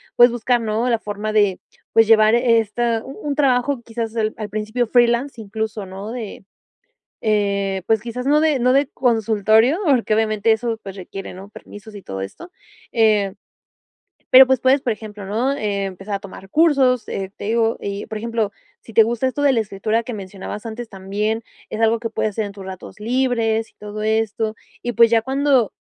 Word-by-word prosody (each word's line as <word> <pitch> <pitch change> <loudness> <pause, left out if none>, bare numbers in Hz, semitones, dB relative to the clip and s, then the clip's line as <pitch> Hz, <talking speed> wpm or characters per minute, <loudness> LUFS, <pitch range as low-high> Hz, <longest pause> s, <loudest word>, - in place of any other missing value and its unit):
puedes 240 0 +7
buscar 240 0 0
¿no? 225 +2 -1
La 230 - +2
forma 210 +1 -4
de, 205 -3 +2 0.3
pues, 225 0 +6
llevar 215 0 +6
esta 230 -1 +1
u - - -10
un 290 - -1
trabajo 270 -2 +1
quizás 225 0 -5
al 215 -1 -1
al 210 -1 -5
principio 215 +4 -1
freelance 240 +2 +2
incluso 215 -1 -4
¿no? 195 +4 -7
De, 225 -5 -7 0.8
eh, 200 -3 0
pues, 220 -1 +2
quizás 245 +2 -5
no 295 +2 +4
de 310 -3 +2
no 250 +1 +3
de 275 +1 +3
consultorio, 225 - +2
porque 245 -6 +3
obviamente 215 0 +1
eso 225 0 0
pues 195 -1 -8
requiere 195 +1 -8
¿no? 190 +2 -11
Permisos 210 +1 -12
y 200 - -9
todo 95 - -6
esto, 100 - -9 0.4
eh. 210 -4 +3 1.0
Pero, 260 0 +9
pues, 265 -1 +3
puedes 265 +2 +4
por 240 - 0
ejemplo 210 -1 -9
¿no? 230 +7 0
Empezar 200 -2 -3
a - - -5
tomar 195 -1 -11
cursos, 275 -5 +3
eh, 195 -1 -4
te - - -8
digo 225 +1 +1
y 200 0 -4
por 215 - -5
ejemplo 230 -2 -1 0.3
si 225 - -14
te 225 - +7
gusta 235 +3 -1
esto 260 - -4
de 280 - +4
la 235 - +2
escritura 215 +2 -1
que 240 +1 -6
mencionabas 200 +2 -7
antes 230 +1 -6
también 205 +3 -2 0.3
es 215 - -4
algo 225 0 +3
que 230 -1 -4
puedes 220 -1 -1
hacer 220 +2 -2
en - - -7
tus 195 -1 -10
ratos 190 +2 -9
libres 230 -2 0
y - - -38
todo 210 0 -7
esto 220 0 0 0.3
y 240 - -2
pues, 230 0 +5
ya 230 -1 +3
cuando, 265 -2 +2
225 Hz, 190 wpm, -20 LUFS, 210-240 Hz, 1.0 s, Pero